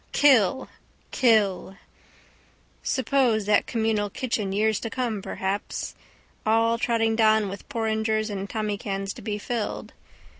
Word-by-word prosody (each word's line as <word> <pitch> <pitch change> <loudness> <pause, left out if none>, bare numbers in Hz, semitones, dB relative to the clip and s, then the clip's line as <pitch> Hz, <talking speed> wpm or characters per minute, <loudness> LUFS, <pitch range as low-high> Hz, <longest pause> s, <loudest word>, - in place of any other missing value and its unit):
Kill! 265 -4 +4 0.4
Kill! 205 -6 +2 1.0
Suppose 255 -5 +1
that 205 0 +3
communal 220 -2 0
kitchen 215 -3 -2
years 215 +1 +1
to 225 - -4
come 230 -4 -2
perhaps. 190 +1 -3 0.5
All 225 +1 +2
trotting 225 -2 +1
down 220 -2 +3
with 195 +5 -9
porringers 220 -3 -1
and 200 0 -4
tommycans 200 -2 -3
to - - -11
be 210 -2 -3
filled. 225 +1 -4
220 Hz, 115 wpm, -25 LUFS, 205-230 Hz, 1.0 s, Kill